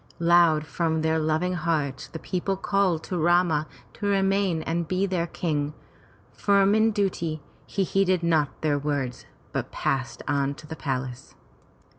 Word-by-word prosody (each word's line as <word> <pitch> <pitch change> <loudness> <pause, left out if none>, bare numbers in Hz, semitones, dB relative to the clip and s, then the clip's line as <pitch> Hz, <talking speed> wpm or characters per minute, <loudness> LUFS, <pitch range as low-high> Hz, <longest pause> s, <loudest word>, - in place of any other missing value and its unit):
Loud 170 -2 +4
from 160 0 -1
theif 160 0 +1
loving 160 +4 +1
hearts 155 -5 -1
the - - -7
people 190 +3 -2
called 195 -5 +1
to 180 - -3
Rama 170 -2 +3 0.3
to 205 - -4
remain 195 -4 +2
and 165 0 -2
be 185 +3 +1
their 180 -3 -1
King. 150 -3 -2 0.6
Firm 200 0 +3
in 220 +1 +4
duty, 185 -7 -1 0.3
he 195 - 0
heeded 185 -2 +1
not 160 -4 +1
their 145 -2 +1
words 140 -4 -3 0.2
but - - -3
passed 130 -3 -2
on 140 0 0
to 155 - -13
the 160 +1 -7
palace. 130 -4 -4
165 Hz, 150 wpm, -26 LUFS, 150-185 Hz, 0.6 s, Loud